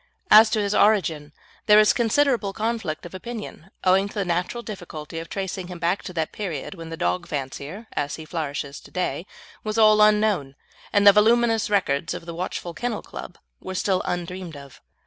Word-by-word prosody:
As 215 +1 +9
to 215 - 0
his 205 -1 0
origin, 165 -10 +2 0.4
there 210 0 +8
is 215 - +5
considerable 235 -3 +1
conflict 220 -8 -3
of 175 - -10
opinion, 210 -3 -8
owing 190 +2 +4
to - - -11
the 200 -2 -1
natural 180 +7 -2
difficulty 165 -7 -7
of 165 - -8
tracing 190 -2 -4
him 180 -1 -7
back 175 +3 0
to 180 - -8
that 160 -2 -2
period 180 -9 -5
when 165 -3 -9
the 165 - -6
dog 175 +1 -1
fancier, 145 - -5
as 145 - -2
he 160 - -9
flourishes 145 -3 -4
to - - -16
day, 180 0 -3 0.4
was 215 0 -3
all 215 -1 +6
unknown, 210 -10 +3 0.4
and 205 -1 +3
the 200 - +10
voluminous 225 +1 +3
records 175 -5 0
of 175 -1 -9
a 170 - -5
watchful 175 0 -4
Kennel 240 +3 -3
Club - - -9 0.2
were 185 - -7
still 185 0 +1
undreamed 180 -2 -4
of. 140 -2 -13
185 Hz, 185 wpm, -24 LUFS, 165-215 Hz, 0.4 s, the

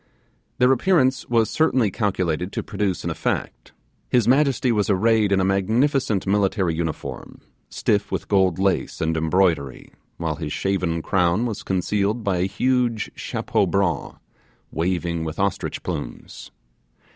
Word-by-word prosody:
Their 125 +1 +4
appearance 135 -3 +2
was 115 -2 +2
certainly 130 -9 +2
calculated 90 -4 -1
to - - -3
produce 100 -3 -2
an - - -2
effect. - - -3 0.4
His 120 -3 +2
majesty 135 -1 +3
was 105 -3 +1
arrayed 110 +1 +3
in 100 - +3
a 95 - +2
magnificent 110 +4 +1
military 95 -3 +1
uniform, 80 -1 -5 0.3
stiff 100 -1 0
with - - -3
gold 95 -4 +2
lace 95 0 0
and 80 0 0
embroidery, 80 -4 0 0.2
while 80 -3 -3
his 80 -3 -5
shaven 90 -4 -1
crown 90 +4 +1
was 110 -4 -4
concealed 100 +4 -1
by 100 -3 0
a 90 +2 +1
huge 120 +2 0
chapeau 100 - -1
bras, 95 -1 -1 0.6
waving 85 -1 -1
with 80 -1 -5
ostrich 100 0 -2
plumes. - - -6
100 Hz, 135 wpm, -22 LUFS, 90-115 Hz, 0.6 s, Their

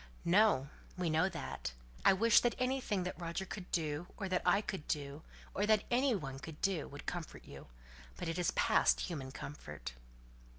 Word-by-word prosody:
"No! 170 -7 +4 0.3
we 175 -3 0
know 160 +4 +3
that. - - -5 0.3
I - - +8
wish 225 +4 +6
that 240 - +1
anything 255 -7 0
that 180 0 -5
Roger 170 +3 -3
could 190 -2 -7
do, 155 0 -1
or 195 - -3
that 185 -1 +1
I 200 - +6
could 195 -6 -5
do, 145 0 -2 0.3
or 205 +2 +1
that 215 -1 +4
any 255 0 +4
one 135 -7 -5
could 155 +1 -9
do, 190 -6 0
would 145 +1 -10
comfort 175 -3 -5
you; - - -11 0.5
but - - -4
it 165 +2 -2
is 175 - +2
past - - +3
human 140 -7 -4
comfort." 75 - -7
175 Hz, 180 wpm, -35 LUFS, 150-200 Hz, 0.5 s, I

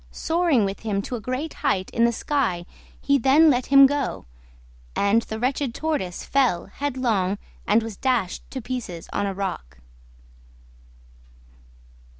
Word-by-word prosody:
Soaring 320 - +1
with 195 0 -4
him 200 -3 -2
to 250 - -4
a 230 - -5
great 255 +7 -3
height 195 -10 0
in 230 - +3
the 235 - +3
sky 235 -9 -1 0.3
he 280 0 +2
then 290 +6 +5
let 250 -1 0
him 275 0 +8
go, 280 -1 -1 0.7
and 200 +3 +3
the 220 -1 -6
wretched 255 +1 -1
Tortoise 295 - -3
fell 255 -11 +1
headlong 230 -6 -1 0.3
and 220 +2 +3
was 220 -3 -7
dashed 245 -8 0
to 260 - -5
pieces 220 -9 -5
on 205 - 0
a 195 - -2
rock. 185 - -5
240 Hz, 145 wpm, -24 LUFS, 200-275 Hz, 0.7 s, him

